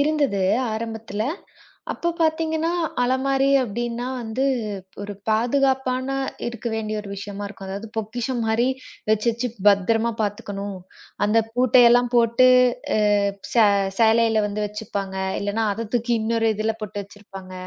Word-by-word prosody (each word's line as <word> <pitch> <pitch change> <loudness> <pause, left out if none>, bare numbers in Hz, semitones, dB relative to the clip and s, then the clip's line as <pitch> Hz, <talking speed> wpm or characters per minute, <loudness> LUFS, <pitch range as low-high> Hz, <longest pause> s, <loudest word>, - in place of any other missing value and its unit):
இருந்தது 285 -9 +1 0.3
ஆரம்பத்துல. 225 -1 -4 0.7
அப்பப் 340 0 -3
பார்த்தீங்கன்னா 320 0 +1 0.3
அலமாரி 270 +2 +1 0.2
அப்படின்னா 240 +2 -3
வந்து 230 +3 -2 0.6
ஒரு 205 0 -5 0.2
பாதுகாப்பான 260 +2 +1 0.4
இருக்க 240 0 -8
வேண்டிய 215 -1 -2
ஒரு 205 - -10
விஷயமா 200 +1 -6
இருக்கும். 200 -1 -9
அதாவது 200 +4 -6
பொக்கிஷம் 235 +3 -2
மாரி 225 +3 +2 0.4
வச்சு 215 +1 +1
வச்சு 235 +2 -2 0.2
பத்திரமா 225 +4 +2
பாத்துக்கணும். 200 -1 -4 0.5
அந்தப் 225 +1 +2
பூட்டை 255 0 +5
எல்லாம் 245 0 +3
போட்டு 235 +2 +5 0.7
அ - - +2 0.3
சே 230 -3 +6 0.3
சேலையில 225 -1 +4
வந்து 210 +1 -3
வச்சிருப்பாங்க. 200 -2 -5 0.2
இல்லைன்னா 205 +2 -1
அதைத் 225 +1 -6
தூக்கி 240 0 +1
இன்னொரு 225 0 +1
இதுல 220 +1 0
போட்டு 205 -1 -4
வச்சிருப்பாங்க. 195 -2 -12
225 Hz, 125 wpm, -23 LUFS, 205-245 Hz, 0.7 s, சே